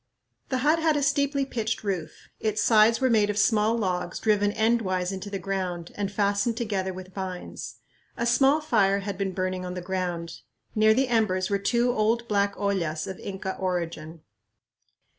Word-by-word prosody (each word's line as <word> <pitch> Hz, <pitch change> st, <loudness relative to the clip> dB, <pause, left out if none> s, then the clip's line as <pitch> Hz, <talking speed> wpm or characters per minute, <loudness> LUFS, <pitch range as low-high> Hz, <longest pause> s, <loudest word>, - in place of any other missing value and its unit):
The 260 Hz, -, 0 dB
hut 315 Hz, +2 st, +4 dB
had 315 Hz, -2 st, +2 dB
a 285 Hz, -, 0 dB
steeply 280 Hz, -1 st, +1 dB
pitched 225 Hz, -5 st, -3 dB
roof. 185 Hz, -6 st, -4 dB
Its 215 Hz, -1 st, -1 dB
sides 225 Hz, 0 st, +5 dB
were 260 Hz, -, +3 dB
made 210 Hz, -2 st, +3 dB
of 210 Hz, -, -2 dB
small 215 Hz, +1 st, +3 dB
logs 180 Hz, -5 st, -2 dB
driven 205 Hz, -2 st, +2 dB
endwise 200 Hz, -5 st, +1 dB
into 195 Hz, +1 st, -6 dB
the 200 Hz, -, -3 dB
ground 185 Hz, -3 st, -3 dB
and 200 Hz, -1 st, -3 dB
fastened 205 Hz, +3 st, +1 dB
together 200 Hz, -5 st, -1 dB
with 185 Hz, 0 st, -10 dB
vines. 185 Hz, -2 st, -6 dB, 0.4 s
A 235 Hz, -, -1 dB
small 270 Hz, +5 st, +4 dB
fire 200 Hz, -9 st, +2 dB
had 200 Hz, 0 st, -4 dB
been 195 Hz, 0 st, -2 dB
burning 185 Hz, 0 st, -2 dB
on 180 Hz, 0 st, -5 dB
the -, -, -3 dB
ground. 175 Hz, -2 st, -3 dB, 0.3 s
Near 215 Hz, 0 st, +4 dB
the 265 Hz, +2 st, +2 dB
embers 210 Hz, -6 st, +1 dB
were 200 Hz, -, +2 dB
two 240 Hz, +4 st, +2 dB
old 230 Hz, +1 st, +1 dB
black 200 Hz, -1 st, +1 dB
ollas 175 Hz, -6 st, -1 dB
of 190 Hz, -, -7 dB
Inca 190 Hz, -1 st, -5 dB
origin. 170 Hz, -3 st, -3 dB
200 Hz, 175 wpm, -26 LUFS, 185-230 Hz, 0.4 s, sides